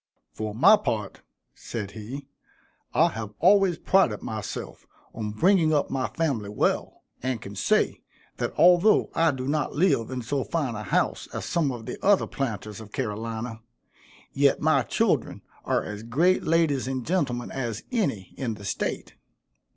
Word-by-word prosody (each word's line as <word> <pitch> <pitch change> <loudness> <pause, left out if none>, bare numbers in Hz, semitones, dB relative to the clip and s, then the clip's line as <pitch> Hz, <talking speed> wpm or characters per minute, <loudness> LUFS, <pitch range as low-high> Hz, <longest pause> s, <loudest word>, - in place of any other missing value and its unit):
"For 110 -1 -4
my 200 - +7
part," 110 - -3 0.3
said 105 -4 -6
he, 115 +7 -7 0.7
"I - - +4
have 105 -1 -7
always 190 -1 +4
prided 185 - +2
myself 110 -2 -6 0.3
on 110 -2 -4
bringing 160 - +3
up 145 - 0
my 135 -1 0
family 135 -11 -2
well, 105 - -1 0.2
and 130 -2 -2
can 100 -1 -9
say, 100 - +1 0.4
that - - -2
although 180 +4 +5
I 165 0 +3
do 130 -3 -3
not 150 +1 -1
live 150 -9 +2
in 130 -2 -4
so 135 +3 -1
fine 145 -8 -2
a 105 - -5
house 105 - 0
as - - -4
some 165 -6 0
of 120 -3 -7
the - - -7
other 200 0 +4
planters 110 -5 -4
of 105 -1 -12
Carolina, 110 +2 -4 0.7
yet 140 0 +3
my 155 -3 +3
children - - 0 0.2
are - - +1
as 105 0 -6
great 155 +12 +2
ladies 155 -5 +1
and 130 -2 -3
gentlemen 140 -9 -1
as 120 -5 -4
any 140 - -1
in 115 -4 -2
the 100 -1 -11
state. - - -3
130 Hz, 160 wpm, -26 LUFS, 110-160 Hz, 0.7 s, my